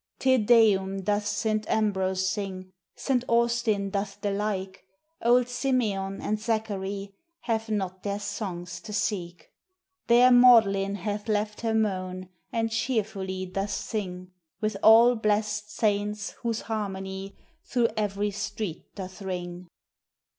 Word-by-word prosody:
"Te 260 0 +3
Deum," 205 -4 +4
doth 205 +2 0
Saint 215 0 -1
Ambrose 190 -3 +1
sing, 190 -2 -4 0.2
Saint 255 -3 0
Austin 235 -4 +1
doth 200 0 -3
the 205 - 0
like; 195 -2 -3 0.4
Old 245 +1 +4
Simeon 220 -7 -1
and 215 0 -2
Zacharie 200 -3 -3 0.3
Have 225 -1 -2
not 190 -3 -2
their 200 0 -2
songs 180 -4 -5
to 210 - -8
seek. 180 -4 -3 0.6
There 245 +1 +6
Magdalene 220 -6 +6
hath 205 +3 -4
left 210 0 -1
her 225 -1 0
moan, 185 -4 -1 0.2
And 225 -1 -1
cheerfully 210 -5 -2
doth 195 +2 -3
sing, 185 -3 -4 0.3
With 215 -1 -1
all 230 +3 +8
blest 210 -1 0
saints 210 -1 -1
whose 230 -2 -1
harmony 195 -3 -5 0.3
Through 240 -3 +1
every 205 -1 -1
street 205 -3 -4
doth 190 0 -8
ring. 180 -2 -5
205 Hz, 125 wpm, -27 LUFS, 195-220 Hz, 0.6 s, all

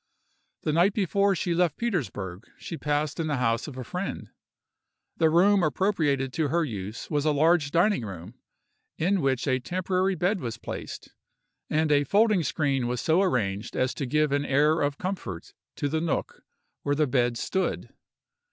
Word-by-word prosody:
The 155 - 0
night 175 +5 +4
before 200 0 +2
she 175 0 -1
left 170 -3 +1
Petersburgh 115 - -3
she 170 - -6
passed 150 -1 -1
in 160 - -1
the 150 - 0
house 115 0 0
of 135 -4 -8
a 130 - -4
friend. 180 +10 -5 0.9
The 160 -1 +4
room 190 +5 +4
appropriated 150 -6 +1
to 160 -2 0
her 170 +3 +1
use 105 - -6
was 145 -2 +1
a 155 - +2
large 155 +1 +3
dining 175 - +2
room, 95 0 -8 0.6
in 185 +3 +1
which 130 -3 0
a 130 -2 +1
temporary 185 +5 0
bed 185 +4 0
was 120 -5 -5
placed, - - -7 0.6
and 155 0 +1
a 145 0 +4
folding 205 - +3
screen 140 -5 0
was 125 0 -2
so 165 +7 +2
arranged 110 - -1
as 130 0 +1
to 140 - -4
give 150 +2 +2
an 145 0 +1
air 150 +4 +3
of 145 0 0
comfort 180 - -5 0.2
to 145 - -1
the 160 +2 -1
nook 165 -2 -2 0.4
where 145 - 0
the 150 +1 +2
bed 120 -3 +1
stood. 190 +8 -2
150 Hz, 170 wpm, -27 LUFS, 130-180 Hz, 0.9 s, night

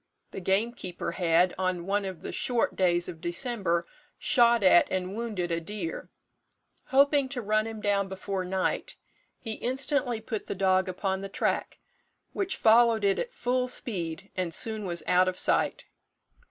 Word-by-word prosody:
The - - -6
gamekeeper 190 -2 -1
had, 175 +1 +2
on 185 -2 -1
one 200 +1 0
of 190 -3 -6
the - - -6
short 245 -2 0
days 175 -2 +2
of 165 -3 -8
December, 175 -2 -1 0.3
shot 235 -6 +4
at 185 -2 +5
and 185 0 -2
wounded 210 -7 -3
a 165 0 -1
deer. 170 -2 -5 0.8
Hoping 280 0 +3
to 265 -2 -2
run 215 +1 +1
him 220 -1 -7
down 200 -2 +1
before 190 0 -4
night, 185 +1 -2 0.4
he 225 - -6
instantly 260 -1 0
put 220 -1 -5
the - - -3
dog 190 0 +2
upon 190 +1 -2
the 195 - -6
track, - - -1 0.6
which 385 -1 -2
followed 225 -1 +5
it 200 -1 +2
at - - -3
full 250 - -1
speed, 185 -7 -3
and 180 -3 -2
soon 220 -2 0
was 170 -3 -3
out 180 +1 +4
of 185 0 -1
sight. - - +1
195 Hz, 160 wpm, -28 LUFS, 180-235 Hz, 0.8 s, at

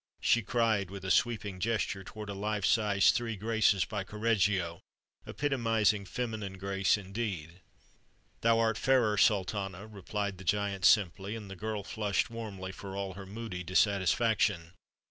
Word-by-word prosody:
she 120 - +3
cried 110 -4 +1
with 95 0 -8
a 95 - 0
sweeping 105 -3 +1
gesture 110 -3 -1
toward 105 +2 -8
a 100 - -4
life 105 0 -2
size 105 -4 +4
"Three 115 -2 -2
Graces," 105 -3 +2
by 100 +2 -4
Correggio, 100 -5 0 0.5
epitomizing 115 -7 +1
feminine 110 -4 -4
grace 95 0 +1
indeed. 95 -4 -5 0.8
"Thou 115 0 +4
art 115 -1 +1
fairer, 125 -6 +3
Sultana," 100 -2 +1
replied 100 -2 -4
the - - -9
giant 100 0 0
simply; 100 0 +3
and 105 -3 -8
the - - -6
girl 105 +1 -4
flushed 105 0 -1
warmly 100 -5 -6
for 95 0 -8
all 100 -1 -3
her 95 +1 -9
moody 100 -3 -6
dissatisfaction. 95 -1 +2
100 Hz, 145 wpm, -31 LUFS, 95-110 Hz, 0.8 s, size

